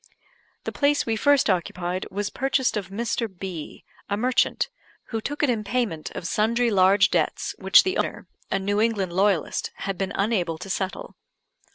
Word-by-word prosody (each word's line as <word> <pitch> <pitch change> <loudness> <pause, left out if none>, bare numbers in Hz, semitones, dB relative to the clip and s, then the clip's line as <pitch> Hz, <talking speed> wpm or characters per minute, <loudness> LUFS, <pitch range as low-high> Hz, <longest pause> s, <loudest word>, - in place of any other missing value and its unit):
The - - -3
place 290 0 +2
we 225 - 0
first 285 +4 +3
occupied 180 -1 -1
was 205 +2 -3
purchased 265 -1 +1
of 200 -3 -3
Mr. 230 +3 -2
B, 180 -4 -7 0.2
a 200 - 0
merchant, 250 +3 +1 0.4
who 225 -2 -2
took 290 +5 -3
it 290 - +3
in 220 -3 -1
payment 210 -8 -2
of - - -5
sundry 230 +5 +1
large 190 0 +5
debts - - 0
which - - +6
the 375 0 -1
owner, - - -3 0.2
a - - +1
New 205 +2 0
England 205 -6 0
loyalist, 190 -3 +1
had 195 -2 -4
been 195 0 -1
unable 195 -6 0
to 195 +4 -6
settle. 190 -1 -4
205 Hz, 170 wpm, -25 LUFS, 190-235 Hz, 0.4 s, which